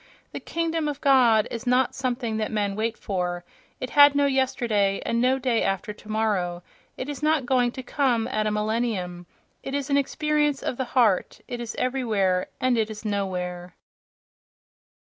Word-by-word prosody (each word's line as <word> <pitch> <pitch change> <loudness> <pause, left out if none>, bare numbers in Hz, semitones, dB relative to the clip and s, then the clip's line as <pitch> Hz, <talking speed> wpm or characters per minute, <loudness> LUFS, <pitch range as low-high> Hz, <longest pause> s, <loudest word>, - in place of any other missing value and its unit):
The - - -5
"kingdom 330 -1 -2
of 290 -1 -3
God" 245 -7 +4
is 235 +2 -6
not 250 +1 +3
something 245 -3 -2
that 215 -1 -2
men 205 -2 -1
wait 225 +2 -2
for: 180 -2 -3 0.3
it 255 - -5
had 285 -1 +7
no 285 0 +3
yesterday 240 -7 +1
and 235 0 0
no 255 +2 +3
day 250 -3 0
after 195 +2 -1
tomorrow, 210 -5 -2 0.3
it 255 - -4
is 290 -2 -6
not 305 -3 +2
going 245 -1 +2
to 260 - -7
come 250 -4 +1
at 215 0 -1
a - - 0
"millennium"—it 210 +1 -4
is 285 0 -3
an 280 - +4
experience 295 0 0
of 245 - -2
the 260 - -1
heart, 215 -7 +2
it 245 - -5
is 230 -1 -5
everywhere 215 -8 0
and 255 -2 +2
it 220 0 0
is 215 0 -8
nowhere.... 180 -3 -3
235 Hz, 170 wpm, -25 LUFS, 205-265 Hz, 0.3 s, had